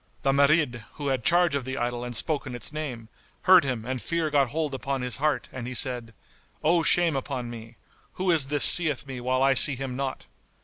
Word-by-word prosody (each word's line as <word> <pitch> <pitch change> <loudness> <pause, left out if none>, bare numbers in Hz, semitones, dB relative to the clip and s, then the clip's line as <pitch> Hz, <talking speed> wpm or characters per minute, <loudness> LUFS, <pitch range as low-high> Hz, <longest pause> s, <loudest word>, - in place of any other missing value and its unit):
The 135 - +2
Marid 140 -4 +1
who 145 -2 -5
had 130 -3 -2
charge 175 +1 +3
of 140 -2 -2
the 130 +2 -6
idol 120 0 -3
and 125 0 -6
spoke 150 +3 -1
in 125 - -7
its 120 +4 -5
name, 130 -8 -6 0.4
heard 185 -3 +6
him 125 -5 -4
and 130 -1 -4
fear 165 -2 -3
got 140 -3 +1
hold 150 +1 -3
upon 135 0 -4
his 125 -1 -2
heart 150 +2 -1
and 120 -2 -7
he 130 - -6
said, 120 -3 -3 0.5
"O 165 +2 +2
shame 165 0 +2
upon 130 -3 -5
me! 115 0 -11 0.4
Who 185 0 -1
is 155 -5 +4
this 145 +1 +6
seeth 155 -6 +6
me 130 -3 -8
while 130 +1 -1
I 135 0 +3
see 135 +2 +4
him 130 -1 -6
not?" 135 0 -5
135 Hz, 220 wpm, -25 LUFS, 125-150 Hz, 0.5 s, heard